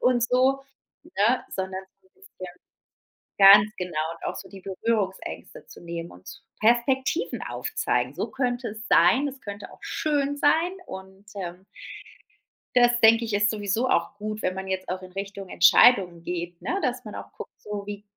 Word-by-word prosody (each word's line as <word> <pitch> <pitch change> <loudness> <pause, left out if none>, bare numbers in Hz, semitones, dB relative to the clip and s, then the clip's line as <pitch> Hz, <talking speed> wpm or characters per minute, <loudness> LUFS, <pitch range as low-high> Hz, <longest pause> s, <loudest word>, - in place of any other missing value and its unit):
und 250 -2 +2
so, 260 +3 +2 0.5
ne, 230 +5 +2
sondern 190 0 -4 0.2
so - - -29
'n - - -61
bisschen 380 - -12 0.9
ganz 200 +2 +8
genau, 180 -1 -4 0.2
und 165 - -13
auch - - -3
so 190 - -9
die 195 -2 -12
Berührungsängste 200 - -3
zu - - -14
nehmen 170 0 -6
und 90 +1 -17
z - - -10 0.2
Perspektiven 260 +7 +1
aufzeigen: 435 - -2
„So - - -3
könnte 250 -2 -2
es 215 +1 -9
sein. 260 +12 +4
Es 270 0 -10
könnte 205 0 -8
auch - - -18
schön 285 -2 -1
sein“, 325 +5 +2
und, 190 +1 -11
ähm 180 -1 -7 1.1
das 240 -1 +4
denke 230 +1 +6
ich, 220 -2 -4
ist 205 +1 +3
sowieso 215 +3 -1
auch 170 +4 +1
gut, 215 +1 -5
wenn 185 - -1
man 190 0 -6
jetzt 190 0 -3
auch 185 +1 -3
in 185 0 -12
Richtung 195 0 -6
Entscheidungen 175 -1 +5
geht, 175 0 -5
ne, 370 - -2
dass 250 -3 -2
man 210 - -8
auch - - -9
guckt, - - -9
so: 205 -1 -6
„Wie 205 0 -7
205 Hz, 175 wpm, -25 LUFS, 190-250 Hz, 1.1 s, ganz